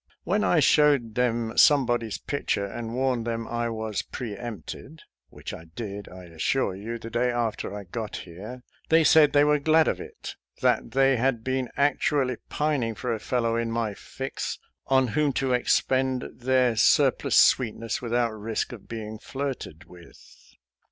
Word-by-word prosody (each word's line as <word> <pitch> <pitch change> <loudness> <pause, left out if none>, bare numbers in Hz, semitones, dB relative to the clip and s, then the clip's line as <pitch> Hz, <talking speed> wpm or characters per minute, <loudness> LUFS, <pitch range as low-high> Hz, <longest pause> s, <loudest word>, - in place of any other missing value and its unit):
When 205 +5 +1
I 175 - +3
showed 145 -7 +4
them 115 -1 0
some 145 -3 +6
body's 115 -3 -1
picture 120 -7 -2
and 115 +3 -6
warned 125 -3 0
them 115 -1 -3
I 120 0 -2
was 110 -2 -3
pre 115 -5 -6
empted, 120 - -8
— - - -47
^which - - -7
I 80 - -12
did, 100 +4 -7
I 90 0 -11
assure 90 +7 -1
you, 110 +4 -5
the 115 0 -9
day 120 +2 +1
after 120 -5 -2
I 100 0 -6
got 105 +3 -6
here, 105 +9 -9
— - - -35
they 160 0 +5
said 155 -1 +6
they 145 0 +5
were 150 0 +3
glad 160 +2 +4
of - - -1
it - - -9
— - - -29
that 115 - +1
they 135 0 +4
had 120 -1 0
been 130 -1 -1
actually 140 -3 +1
pining 140 -7 -1
for 125 +2 -2
a 110 - -3
fellow 115 -1 0
in 115 0 -1
my 115 -2 -1
fix 135 +6 -5 0.3
on 130 -2 +3
whom 145 +3 +1
to 130 -1 0
expend 130 +1 +1
their 125 -1 +2
sur 110 - +5
plus - - -2
sweetness 115 -2 +3
without 120 -1 0
risk 110 +1 -3
of 115 -5 -11
being 110 -1 -6
flirted 135 - -5
with. 85 -1 -18
120 Hz, 180 wpm, -26 LUFS, 110-135 Hz, 0.3 s, some